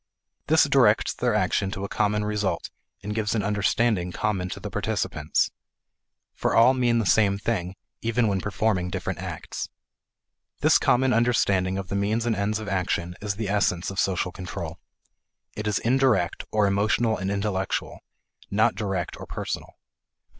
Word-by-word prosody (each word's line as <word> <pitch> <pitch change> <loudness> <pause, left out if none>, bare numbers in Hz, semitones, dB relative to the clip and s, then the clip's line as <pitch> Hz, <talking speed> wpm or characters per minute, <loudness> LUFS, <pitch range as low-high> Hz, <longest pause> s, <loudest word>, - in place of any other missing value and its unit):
This - - +5
directs - - +4
their - - 0
action 95 - +1
to 95 0 -5
a - - -2
common 105 +1 0
result, 105 -1 -2 0.3
and 105 +1 -3
gives 110 0 -1
an 105 - 0
understanding 105 -2 +1
common 95 -2 -1
to - - -6
the - - -6
participants. 75 +1 -1 0.8
For - - -1
all 120 +3 +7
mean 120 -2 +2
the 115 - +1
same 100 0 +3
thing, 95 -4 -2 0.3
even 115 0 +1
when 95 -2 0
performing 95 -2 0
different 95 -1 -4
acts. 90 -4 -5 0.9
This - - +5
common 130 +1 +3
understanding 100 -5 +2
of 95 -2 -5
the - - -2
means 105 +4 0
and 115 -2 +1
ends 100 +1 0
of 110 -1 -6
action 90 -2 -1
is 100 -2 -2
the 105 0 -3
essence 95 -3 +1
of 95 - -4
social 90 -1 0
control. 90 0 -6 0.8
It 105 0 -4
is 105 -2 +1
indirect, 120 -8 +1
or 105 -1 +3
emotional 105 +3 +2
and 95 +1 -3
intellectual, 100 -1 -2 0.5
not 110 +3 +3
direct 95 -5 -3
or - - -8
personal. - - -5
100 Hz, 160 wpm, -25 LUFS, 95-110 Hz, 0.9 s, all